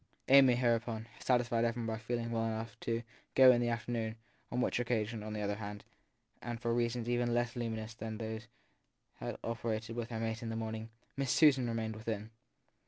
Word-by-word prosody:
Amy, 135 -2 +8
hereupon, 115 -2 +1
satisfied 120 -2 +2
everybody 115 -1 -1
by - - -17
feeling 115 0 -2
well 115 -1 0
enough 110 -1 -4
to 115 0 -1 0.3
go 130 -1 +9
in 120 -1 +3
the 120 - +1
afternoon; 115 -1 -2 0.4
on 125 - -1
which 125 - +1
occasion, 115 -2 0
on 105 0 -5
the 105 - -3
other 100 0 -1
hand 105 -1 -6 0.6
and 120 0 -4
for 115 0 0
reasons 120 0 0
even 120 0 +1
less 120 0 0
luminous 110 -2 -3
than 110 0 -5
those 110 0 -5 0.7
that - - -6
had - - -9
operated 115 -1 -2
with 120 0 -3
her 115 -2 -3
mate 115 +1 -2
in 115 - -4
the 115 - -3
morning 110 0 -4 0.3
Miss 135 -2 0
Susan 135 -6 +5
remained 110 -1 -2
within. 110 0 -4
115 Hz, 190 wpm, -34 LUFS, 110-120 Hz, 0.7 s, go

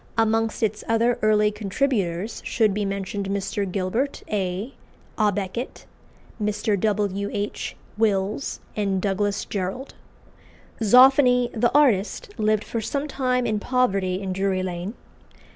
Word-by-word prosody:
Amongst 225 0 +1
its 215 -1 0
other 230 +1 +2
early 210 -1 +3
contributors 205 -2 -1
should 215 -4 +2
be 205 0 -1
mentioned 195 0 -3
Mr. 200 0 -2
Gilbert 210 +9 -1
A. 200 +4 -2 0.5
à 210 -1 +4
Beckett, 205 +5 -4 0.6
Mr. 210 0 0
W. 200 -1 0
H. 205 0 -3 0.2
Wills, 210 +3 0
and 195 -2 0
Douglas 200 +1 -1
Jerrold. 200 +7 -4 0.9
Zoffany, 250 +2 +6
the 240 +1 +2
artist, 285 - +2
lived 215 0 +2
for 230 - -3
some 280 +6 -2
time 255 -3 0
in 215 -2 0
poverty 195 -7 +1
in 190 -2 -3
Drury 190 0 0
Lane. 180 +4 -4
210 Hz, 125 wpm, -24 LUFS, 195-235 Hz, 0.9 s, Zoffany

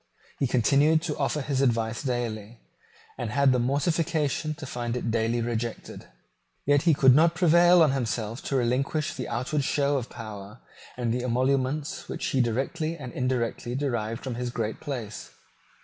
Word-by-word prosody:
He 135 - +2
continued 140 +7 +3
to 155 -3 -3
offer 145 +1 0
his 135 -1 -1
advice 115 -3 +1
daily, 120 -4 -3 0.6
and - - -2
had 140 -1 +3
the 125 - +2
mortification 155 +3 0
to 155 -1 -8
find 120 -2 -3
it 115 -2 -2
daily 115 +1 0
rejected. 115 0 -4 0.6
Yet 145 0 +4
he 165 -2 +4
could 130 -2 +6
not 165 +4 +4
prevail 175 0 +6
on 150 - +3
himself 115 -3 -2
to 140 - -2
relinquish 135 +5 0
the 125 - -5
outward 135 +5 -1
show 140 +1 +1
of 120 - -8
power 105 0 -9 0.4
and 120 -2 -1
the 125 - -1
emoluments 130 +4 -1
which - - -4
he 135 -5 +2
directly 140 +8 -1
and 130 -5 -8
indirectly 125 -1 -2
derived 120 -4 -2
from 130 - -3
his 125 +1 -3
great 110 -2 -3
place. 120 -8 -6
130 Hz, 165 wpm, -26 LUFS, 120-145 Hz, 0.6 s, could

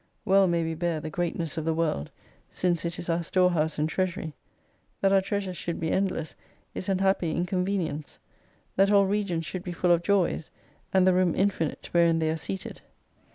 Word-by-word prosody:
"Well 195 0 +5
may 170 -1 +1
we 165 0 -2
bear 170 -1 -1
the 155 +1 -6
greatness 165 -2 -2
of 160 - -5
the 160 -1 +1
World, 155 - -1 0.4
since 175 -2 -1
it 170 +1 -3
is - - -6
our 170 0 +1
storehouse 170 -3 +1
and 150 +1 +1
treasury. 180 -1 -2 0.7
That 195 0 +3
our 195 - +5
treasures 195 -2 -3
should 170 - -4
be 160 -1 -1
endless 185 -5 -1 0.4
is 185 - -5
an 190 - +2
happy 190 -4 +1
incon 180 +1 0
venience: 165 -7 -3 0.6
that 195 +1 +5
all 200 -1 +5
regions 190 -5 -1
should 185 - -4
be 180 - -5
full 175 +1 +1
of 170 -1 +4
Joys: 180 -4 +1 0.4
and 190 -1 +4
the 185 - +5
room 180 -2 +2
infinite 190 -5 0
wherein 170 -1 +4
they 160 -1 +1
are - - -1
seated. 95 -10 -6
175 Hz, 195 wpm, -27 LUFS, 165-190 Hz, 0.7 s, Well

